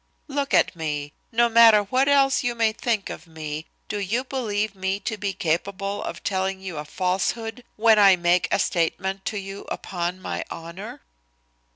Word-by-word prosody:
Look 280 -1 -2
at - - +3
me. 150 -3 -3 0.2
No 235 +1 +4
matter 225 -2 +7
what 255 +7 +1
else 275 -1 +4
you 240 -1 -1
may 225 -1 +2
think 220 -2 -1
of - - -9
me 155 -1 -6 0.2
do 210 - -3
you 215 +6 -1
believe 220 -6 -2
me 190 0 -2
to 220 +2 -2
be 200 -1 -2
capable 195 +3 -2
of 170 - -6
telling 190 0 -1
you 185 -4 -6
a 150 - -4
falsehood 195 +8 -2
when 220 0 +5
a 195 -2 +8
make 175 +1 +2
a - - +4
statement 190 +3 -1
to 210 - -2
you 195 0 -7
upon 175 0 -3
my - - -4
honor?" 170 +5 -8
195 Hz, 175 wpm, -24 LUFS, 180-225 Hz, 0.2 s, a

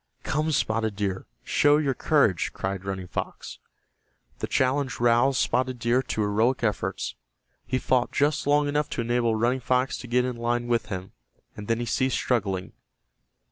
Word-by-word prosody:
"Come, 155 +2 0
Spotted 110 -6 0
Deer, 100 -2 -3 0.2
show 145 0 +4
your 145 -3 +1
courage!" 130 - +2
cried 95 -1 -4
Running 95 -1 -4
Fox. - - -6 0.8
The - - -2
challenge 130 0 0
roused 120 +3 +3
Spotted 125 +1 0
Deer 120 +2 +2
to 120 -4 -3
heroic 110 +5 +1
efforts. 105 -3 -1 0.5
He 130 - 0
fought 130 -1 +1
just 150 +1 +1
long 145 0 +3
enough 150 +1 0
to - - +1
enable 120 -1 +1
Running 120 +4 +1
Fox 125 +1 0
to 125 - -8
get 125 +1 +2
in 125 -2 -3
line 120 +1 -1
with 120 -1 0
him, 95 -1 -6 0.4
and 105 - -8
then 115 0 +1
he 120 - -2
ceased 130 +2 0
struggling. 100 -7 -1
120 Hz, 165 wpm, -26 LUFS, 110-130 Hz, 0.8 s, show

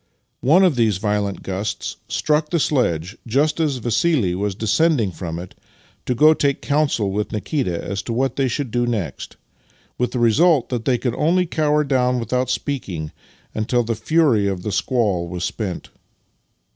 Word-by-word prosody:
One 165 +9 +4
of 175 -8 +3
these 110 -5 +2
violent 105 -1 -2
gusts 100 +4 -4
struck 150 0 0
the 170 - +1
sledge 100 - 0
just 145 +8 +1
as 150 -5 +1
Vassili 120 - +1
was 100 +1 -2
descending 110 - +2
from 85 -2 -6
it 90 +1 -8 0.5
to 125 - +1
go 155 +6 +6
and 160 - 0
take 140 -1 +1
counsel 140 -9 0
with 105 +2 -2
Nikita 105 - -2
as 100 +2 -3
to 115 - -4
what 130 +3 0
they 135 -1 +1
should 130 0 -3
do 120 +1 0
next, 100 - -4 0.6
with 125 - +1
the - - -4
result 130 +5 +3
that 120 -3 -3
they 125 -2 +2
could 120 -1 -2
only 180 +4 +2
cower 150 -2 +1
down 125 -3 +1
without 125 +2 -1
speaking 95 - -3 0.4
until 120 +3 0
the 115 0 -1
fury 130 -5 +2
of 95 -2 -3
the 105 - -3
squall 100 -8 0
was 90 0 -5
spent. 95 -4 -4
120 Hz, 170 wpm, -21 LUFS, 100-145 Hz, 0.6 s, go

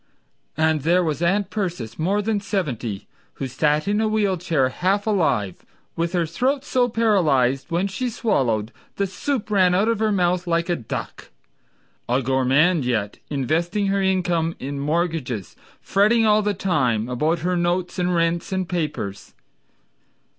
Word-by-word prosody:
And 160 -1 +2
there 175 +5 +3
was 155 -2 -2
Aunt 195 +3 +1
Persis 170 - -4
more 195 +6 +1
than 215 0 0
seventy 125 - -3 0.3
Who - - -4
sat 150 +5 0
in 210 +1 +1
a 220 - +2
wheel 210 -3 +1
chair 165 -7 +1
half 190 +8 0
alive 125 - 0 0.3
With 170 +2 -1
her 175 -2 +1
throat 260 - -1
so 250 -3 +1
paralyzed, 155 - +2
when 175 +3 0
she 245 +6 -2
swallowed 120 - 0 0.2
The 200 - 0
soup 210 +5 -3
ran 185 -3 +4
out 200 +4 +2
of 230 -2 +1
her 220 -1 +1
mouth 180 -2 +1
like 170 +1 0
a 175 - +2
duck— 115 - -6 0.8
A 130 +2 +1
gourmand 135 +6 +3
yet, 110 -5 -2
investing 170 - 0
her 195 0 +1
income 175 -3 0
In 140 +1 -5
mortgages, 150 - -2 0.3
fretting 215 +3 +3
all 215 0 +4
the 205 -1 -1
time 130 - 0
About 155 +7 0
her 180 0 +1
notes 175 +1 -1
and 180 0 +1
rents 170 +1 0
and 190 -1 -1
papers. 150 - -4
175 Hz, 155 wpm, -22 LUFS, 140-200 Hz, 0.8 s, ran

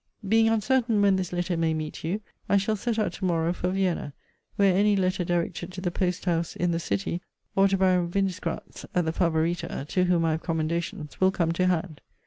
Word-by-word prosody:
Being 225 +2 +4
uncertain 225 0 +2
when 200 -1 +5
this 185 -2 -2
letter 175 0 -1
may 165 -1 +1
meet 155 -1 -5
you, 185 +7 -2 0.3
I 200 - +5
shall 205 +2 +1
set 225 +2 -2
out 205 -5 0
to 190 - -4
morrow 170 -1 +1
for 180 0 -2
Vienna; 185 -6 -1 0.4
where 195 -2 +4
any 205 +1 +4
letter 185 -1 +1
directed 175 0 -2
to 185 - -6
the 180 -2 -1
post 180 0 -1
house 170 -2 0
in 175 0 0
the 165 - 0
city, 100 - -2 0.3
or 195 0 +5
to 195 0 +1
Baron 185 -2 +3
Windisgrat's 190 -1 -3
(at 175 -2 +2
the 160 - -1
Favorita) 165 -4 0
to 185 -1 +2
whom 175 -2 +2
I 160 - +2
have 160 +1 -1
commendations, 160 -1 -3
will 190 - +6
come 170 -3 0
to 185 +2 +1
hand. 165 -3 -1
180 Hz, 210 wpm, -26 LUFS, 165-195 Hz, 0.4 s, will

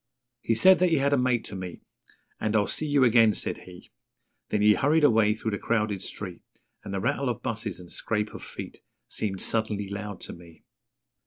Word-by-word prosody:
He 115 - +1
said 185 +11 +6
that 180 0 +4
he 165 - +3
had 140 +1 +2
a - - +6
mate 125 -2 +1
to 100 - -7
meet, 90 -2 -7 0.6
And 110 0 -1
'I'll 105 -1 +3
see 155 - -1
you 145 -2 +3
again,' 115 -3 +5
said - - -2
he, 90 0 -14 0.6
Then 105 - +1
he 105 0 +7
hurried 150 +7 +2
away 110 -5 +4
through 110 0 -3
the 100 - -3
crowded 105 -4 -1
street 95 -3 -6 0.4
And - - -7
the 100 - -2
rattle 130 +7 0
of 120 - -4
buses 105 -5 -3
and 90 -1 -10
scrape 105 -1 -2
of - - -9
feet - - -9 0.3
Seemed 95 -3 -2
suddenly 110 -3 0
loud 100 0 -6
to - - -6
me. 85 -1 -15
110 Hz, 200 wpm, -27 LUFS, 100-120 Hz, 0.6 s, he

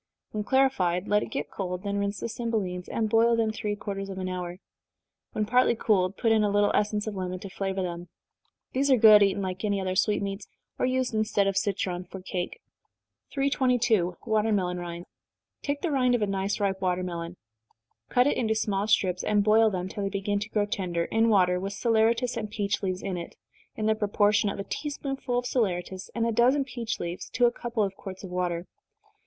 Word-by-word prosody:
When 210 -1 -2
clarified, 205 -9 +2
let 210 0 +3
it - - -5
get 145 +1 -4
cold 180 -2 -4
then 200 0 -1
rinse 200 -1 -2
the - - -2
cymbelines, 215 -7 -3
and 225 -1 0
boil 230 +2 +4
them 225 -1 +1
three 210 -1 -3
quarters 195 -1 -5
of 190 - -6
an 185 0 -3
hour. 180 -1 -4 0.8
When 215 - 0
partly 245 +2 +3
cooled, 195 -4 +1
put 225 - +2
in 220 -1 +4
a 205 - +2
little 205 0 +3
essence 210 0 +1
of 215 - -3
lemon 185 -1 -3
to 190 +1 -9
flavor 195 -1 -2
them. 175 -1 -5 0.6
These 275 +2 +1
are 260 - +6
good 215 -2 +8
eaten 200 0 +2
like 185 +1 -4
any 205 -2 +1
other 185 -1 -2
sweetmeats, 200 0 0 0.3
or - - +2
used 255 -1 0
instead 215 -2 +1
of 195 -1 0
citron 190 -3 -1
for 190 +1 -9
cake. 180 -1 -4 0.7
322. 245 - +1
Watermelon 210 -5 +1
Rinds. 175 0 -6 0.5
Take 285 0 -2
the 340 - -1
rind 250 -3 +3
of 230 - 0
a - - +3
nice 195 0 -1
ripe 195 -2 0
watermelon 180 -2 -2 0.7
cut 250 0 +4
it 290 - +2
into 220 -2 +1
small 205 -2 0
strips, 185 -4 +2
and 205 -1 +2
boil 220 +1 +5
them, 185 -2 -3
till 205 +2 -6
they 200 - -1
begin 200 +1 -1
to 210 +1 -5
grow 210 -1 +1
tender, 175 -4 -2
in 225 +1 +2
water, 180 -4 +4
with 195 +2 -4
saleratus 230 +3 +2
and 215 -2 -3
peach 205 -1 -1
leaves 185 -2 -2
in 190 -2 -2
it, 170 - -7 0.4
in 215 - -3
the 220 - +4
proportion 210 -1 +2
of - - -4
a 200 - -3
tea 295 - -4
spoonful 270 -3 -3
of 245 - -1
saleratus 190 -6 -1
and 230 -1 +1
a 230 - +1
dozen 250 +5 +3
peach 235 -4 -4
leaves 170 +1 -5
to 245 - +2
a 240 - +4
couple 235 -2 -2
of 195 -1 -1
quarts 190 -2 -9
of 185 - -8
water. 175 -1 -1
205 Hz, 205 wpm, -27 LUFS, 185-225 Hz, 0.8 s, good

